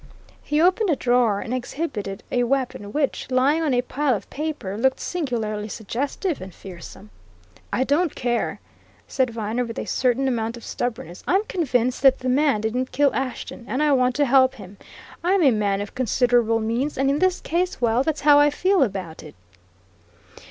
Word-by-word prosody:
He 295 +1 -1
opened 370 +5 +3
a 310 - +3
drawer 240 -5 +2
and 230 - -4
exhibited 240 -6 -4
a 245 - +1
weapon 245 -5 -2
which, 285 -1 -1
lying 270 +5 +2
on 310 -3 0
a 245 -1 +2
pile 275 0 0
of - - -7
paper, 295 -10 -4
looked 260 +4 +1
singularly 225 -10 -3
suggestive 275 - -3
and 190 0 -8
fearsome. 190 +3 -11 0.6
"I 255 - +1
don't 295 +4 +1
care!" 240 -1 -1 0.5
said 260 -2 0
Viner 225 +1 -2
with 230 -1 -7
a - - -3
certain 260 +1 +1
amount 230 -2 -2
of 235 - -12
stubbornness. 245 -6 -5
"I'm 385 +3 +3
convinced 255 - 0
that 265 -1 +6
the 255 - -3
man 275 -4 +2
didn't 245 +4 -2
kill 285 0 +2
Ashton. 255 -2 -4
And 265 +3 -1
I 300 - +3
want 255 -2 +2
to 290 - +2
help 260 0 +4
him. 200 -4 -12 0.5
I'm 370 +1 +3
a 275 - +6
man 205 -3 0
of 205 - -7
considerable 240 -2 +2
means; 235 +7 -1
and 270 +1 +1
in 285 - 0
this 370 0 +2
case 360 +2 -1
well, 235 0 +2
that's 305 +2 -1
how 290 0 +6
I 290 0 +5
feel 370 +6 +1
about 190 -9 -2
it." 150 - -12
255 Hz, 180 wpm, -23 LUFS, 225-290 Hz, 0.6 s, that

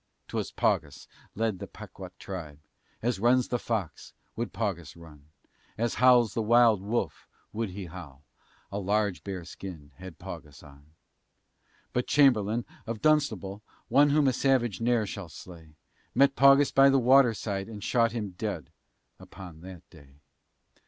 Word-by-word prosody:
'Twas - - -3
Paugus 75 -2 -1 0.3
led 110 -3 -1
the - - -7
Pequa'tt - - -11
tribe; 80 -7 -7 0.5
As 120 -4 0
runs 120 +3 +3
the 125 - -1
Fox, 110 -9 -4 0.2
would 120 +1 -3
Paugus 90 -9 -4
run; 75 -3 -15 0.5
As 115 +1 0
howls 125 -4 +5
the 115 - -1
wild 115 -2 +4
wolf, 110 +4 -3 0.3
would 110 -1 -2
he 95 +1 -7
howl, 80 -5 -11 0.5
A 100 - -3
large 100 -1 0
bear 95 -4 -6
skin 85 -5 -9
had 95 -3 -10
Paugus 75 -2 -10
on. 70 0 -17 1.1
But 125 - -1
Chamberlain, 120 -5 +3 0.2
of 115 -1 -4
Dunstable 110 -11 +1 0.3
(One 145 +4 +5
whom 145 0 +3
a 130 - +3
savage 120 -6 +1
ne'er 120 -2 +2
shall 100 -3 -7
slay), 80 -2 -13 0.4
Met 140 0 +4
Paugus 140 +1 +6
by 135 0 +6
the 135 - +4
water 130 -2 +5
side, 100 0 -4
And 105 -3 -8
shot 115 -1 +2
him 110 -4 -4
dead 90 - -5 0.5
upon 90 -4 -12
that 90 -1 -11
day. 70 -5 -17
105 Hz, 150 wpm, -28 LUFS, 90-120 Hz, 1.1 s, Paugus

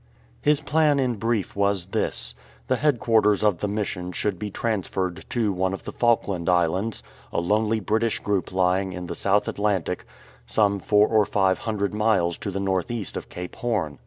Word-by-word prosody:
His 150 0 +3
plan 150 -1 +2
in 125 -4 0
brief 115 -1 -1
was 100 -2 +1
this. 60 - -1 0.3
The 130 - +1
headquarters 115 -8 +3
of 105 -6 +2
the 105 - -1
Mission 100 -3 -3
should 95 0 -2
be 105 - -3
transferred 95 -4 -2
to 110 -5 +1
one 95 +1 0
of 95 - -6
the - - -6
Falkland 100 -7 +1
Islands, 90 +5 +1 0.3
a - - 0
lonely 105 +5 +1
British 110 +2 0
group 100 -2 -1
lying 95 +1 +1
in 90 0 -5
the 85 - -4
South 100 +3 +1
Atlantic, 100 -4 -1 0.4
some 100 -2 +2
four 105 +2 +4
or 110 -2 +3
five 95 -2 +2
hundred 105 -3 -2
miles 105 -6 +1
to - - -3
the 100 0 -3
north 95 -2 0
east 115 -4 -4
of - - -6
Cape 90 0 -7
Horn. 95 - -2
100 Hz, 180 wpm, -24 LUFS, 95-110 Hz, 0.4 s, four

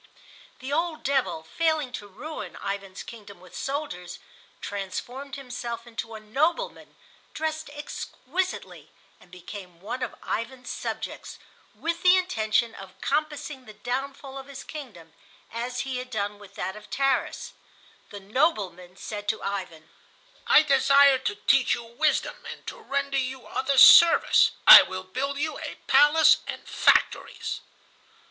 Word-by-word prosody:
The 265 +2 -4
old 330 0 -1
devil, 255 - 0
failing 315 - 0
to 205 -4 -7
ruin 300 +11 -8
Ivan's 195 -1 -5
kingdom 205 -5 -12
with 180 0 -15
soldiers, 225 - -5 0.4
transformed 245 +8 -6
himself 245 -3 -6
into 225 -1 -7
a - - -7
nobleman, 310 - -2 0.4
dressed 315 -1 -3
exquisitely, 295 +4 -5 0.3
and - - -20
became 180 0 -10
one 235 +7 -6
of - - -4
Ivan's 250 +2 -4
subjects, - - -6 0.4
with 335 +1 -3
the 365 +1 +6
intention 230 - 0
of 190 -1 -12
compassing 295 -2 -2
the 215 - -12
downfall 270 +3 -5
of 265 - -11
his 275 -1 -9
kingdom—as 235 - -8
he 265 -1 -4
had 250 0 -6
done 205 -3 -3
with 200 -1 -15
that 190 +2 -4
of 210 0 -13
Tarras. 275 -1 -1 0.6
The 205 - -8
"nobleman" 195 - -1
said 205 0 -7
to 220 - -1
Ivan: 180 -6 -5 0.6
"I 305 - +7
desire 275 -1 +5
to 205 - -2
teach 250 +5 +3
you 235 - -8
wisdom 255 +7 -1
and - - -10
to - - -7
render 280 0 -1
you 260 -1 -4
other 270 +1 -1
service. 340 +5 +8 0.2
I - - +13
will 185 0 -5
build 275 +9 -3
you 310 +2 -3
a - - -6
palace 300 +2 +6
and - - -7
factories." - - +1
255 Hz, 140 wpm, -26 LUFS, 205-280 Hz, 0.6 s, I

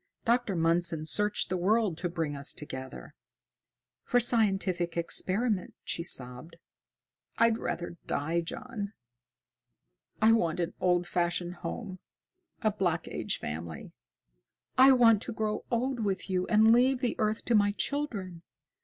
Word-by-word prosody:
Dr. 235 -4 +1
Mundson 165 -1 +2
searched 210 +5 +1
the 185 - -1
world 210 -1 +2
to 175 - -2
bring 160 -4 -3
us 140 0 -1
together." 130 - -8 0.9
"For 245 - +2
scientific 195 -7 0
experiment!" 190 +4 0
she - - -2
sobbed. 125 -1 -1 0.8
"I'd 230 0 +3
rather 170 0 -4
die, 165 +4 -1
John. 210 +2 -6 1.3
I 220 +1 +5
want 175 -7 +1
an 170 -1 -2
old 180 -1 +2
fashioned 175 0 -1
home, 190 -5 -6 0.6
a 215 - +3
Black 175 -5 -1
Age - - -3
family. 80 +1 -6 0.8
I 265 +1 +7
want 230 -4 +5
to 235 - -5
grow 215 -1 -2
old 250 +2 -1
with 195 -2 -2
you 185 0 0
and 220 +1 +5
leave 255 +2 +3
the 245 - 0
earth 215 +1 -1
to 240 - +1
my 205 -2 +4
children. 205 - -3
190 Hz, 135 wpm, -29 LUFS, 170-225 Hz, 1.3 s, I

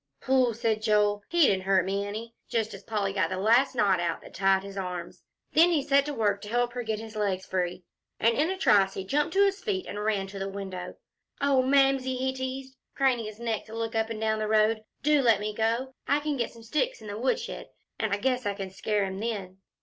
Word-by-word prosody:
"Phooh!" 255 -3 +2
said 225 -2 0
Joel, 210 -1 +2
"he 345 0 +2
didn't 190 -5 +1
hurt 190 -2 +3
me 200 +1 -1
any," 225 +3 -6 0.2
just 225 -2 -1
as - - -9
Polly 205 -3 -1
got 195 - +1
the 185 - -3
last 235 +7 +3
knot 200 -6 +3
out 170 -1 -1
that - - -13
tied 195 0 +2
his 200 0 -9
arms. 180 -3 -5 0.3
Then 335 +3 +6
he 315 -5 +2
set 280 0 +3
to 295 - -3
work 205 -3 +1
to 205 - -8
help 240 +1 0
her 245 - -3
get 220 -2 -2
his 220 0 -9
legs 195 -3 -1
free. 180 -1 -2 0.4
And 230 +1 +3
in 305 +6 +2
a 380 - -2
trice 195 - +4
he 190 - -4
jumped 295 - 0
to 400 +1 +5
his 395 0 0
feet 385 -4 -2
and 205 0 -5
ran 210 -3 0
to 195 0 -8
the 195 0 -3
window. 190 -2 -6 0.4
"Oh, 280 -2 +3
Mamsie," 270 -1 +3
he 260 +1 -1
teased, 260 0 -5 0.2
craning 255 -4 +2
his 215 0 -8
neck 230 -2 -2
to 220 - -10
look 225 0 -3
up 225 0 0
and 225 -1 -4
down 220 0 0
the 215 - -1
road, 215 0 +3 0.2
"do 300 0 +4
let 230 -5 +4
me 210 +1 -3
go. 230 +5 -1
I 285 - +3
can 295 0 -2
get 240 -3 -1
some 230 - -14
sticks 305 - -1
in - - -11
the 205 -1 -5
woodshed, 465 - -2 0.3
and 220 -2 -1
I 200 - +2
guess 250 +1 0
I 200 - -1
can 195 -1 -6
scare 205 +1 0
him 190 0 -5
then." 200 -4 -4
220 Hz, 240 wpm, -28 LUFS, 200-260 Hz, 0.4 s, Then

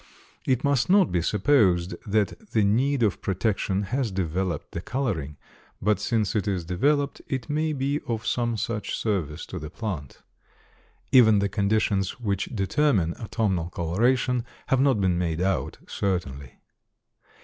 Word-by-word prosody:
It 130 -1 +2
must 140 -1 +2
not 195 -2 +5
be 90 - +1
supposed 95 - +2
that 105 - -1
the 110 - +3
need 125 +6 +2
of 105 -3 +1
protection 100 0 0
has 125 +4 -1
developed 90 -2 -2
the 85 - -4
coloring, 90 - -3 0.4
but 105 +1 +1
since 110 -4 0
it 105 -1 0
is 95 -4 -1
developed 140 - +1
it 130 -1 -3
may 155 +1 0
be 140 +1 -1
of 115 -2 -3
some 120 -2 0
such 105 0 -3
service 85 -8 -2
to 95 - -6
the 75 0 -7
plant. 85 - -6 0.9
Even 110 -5 +7
the 100 0 +1
conditions 100 +1 0
which 100 -5 -1
determine 100 - +1
autumnal 100 -7 -1
coloration 120 +9 +1 0.3
have 130 -1 +3
not 135 -5 +3
been 90 -3 +1
made 85 -2 -1
out 95 +1 -1
certainly. 70 -9 -3
105 Hz, 145 wpm, -25 LUFS, 90-125 Hz, 0.9 s, Even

